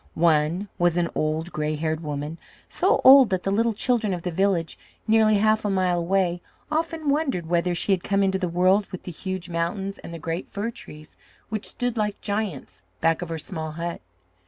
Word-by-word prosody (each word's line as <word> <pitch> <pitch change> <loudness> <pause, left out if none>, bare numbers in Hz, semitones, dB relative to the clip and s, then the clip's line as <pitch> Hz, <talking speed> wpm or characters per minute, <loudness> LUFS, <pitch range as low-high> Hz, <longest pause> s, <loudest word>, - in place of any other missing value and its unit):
One 165 +3 +2
was 175 -1 +2
an 170 -1 0
old, 155 +3 -1
gray 155 0 -1
haired 155 +1 -2
woman, 150 +1 -5 0.3
so - - +1
old 265 -3 +9
that 185 -2 -1
the 195 - 0
little 230 +3 +2
children 215 -3 0
of 175 - -8
the 180 - -2
village, 180 -2 0 0.3
nearly 220 -1 +4
half 215 +1 +2
a 205 - 0
mile 185 -2 +1
away, 175 0 0 0.3
often 320 0 -2
wondered 280 - 0
whether 175 +1 +1
she 185 - -1
had 185 -3 +1
come 200 0 +1
into 190 0 +1
the 180 -2 -1
world 185 +4 +3
with 185 - -7
the 180 - -6
huge 185 +1 -5
mountains, 180 +4 -3
and - - -9
the 170 - -6
great 165 +2 -4
fir 215 +3 -3
trees, 155 -8 -12 0.3
which 215 -1 -3
stood 245 -1 -3
like 210 -1 -1
giants 195 - -4 0.2
back 165 +1 +2
of 175 - -5
her 165 - -3
small 160 -2 -5
hut. 170 +1 -4
180 Hz, 200 wpm, -24 LUFS, 165-205 Hz, 0.3 s, old